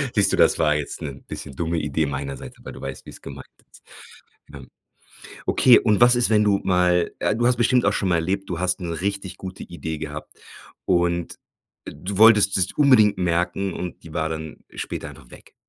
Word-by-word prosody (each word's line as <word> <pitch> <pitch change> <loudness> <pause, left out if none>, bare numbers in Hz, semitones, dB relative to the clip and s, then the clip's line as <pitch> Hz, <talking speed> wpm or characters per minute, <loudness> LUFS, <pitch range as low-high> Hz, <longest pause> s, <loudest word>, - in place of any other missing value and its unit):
Siehst 100 -2 +2
du, - - +1
das - - +4
war 75 -1 +3
jetzt 75 -2 -5
'nen 70 -2 -7
bisschen 70 - -8
dumme 85 +3 -2
Idee 75 +1 -1
meiner 70 0 -4
Seite, - - -11
weil - - -8
du - - -11
weißt, 65 -1 -7
wie's - - -12
gemeint 70 0 -9 0.3
ist, - - -19 0.7
ja. 70 - -9 0.9
Okay, 125 -2 +5
und 105 -2 +1
was 120 +1 +7
ist, 120 -1 +1
wenn 105 -1 +4
du 100 -1 +2
mal 90 -2 +2
äh, - - 0
du 120 +1 +1
hast 125 0 +3
bestimmt 120 +1 +2
auch 100 - +3
schon 100 - -1
mal - - +3
erlebt, 95 +4 -2
du 85 -1 -3
hast 95 +1 0
'ne 85 -2 -4
richtig 100 -1 -3
gute 95 0 -8
Idee 80 -2 -6
gehabt 75 0 -7 0.5
und 85 -1 0 0.5
du 95 +1 -6
wolltest 105 -3 +6
dir's 95 -1 0
unbedingt 125 -8 +5
merken 90 +2 -1
und 90 -2 -6
die 80 - -11
war 80 0 -1
dann 80 -1 -6 0.2
später - - -5
einfach - - -16
weg, - - -16
90 Hz, 205 wpm, -23 LUFS, 80-100 Hz, 0.9 s, was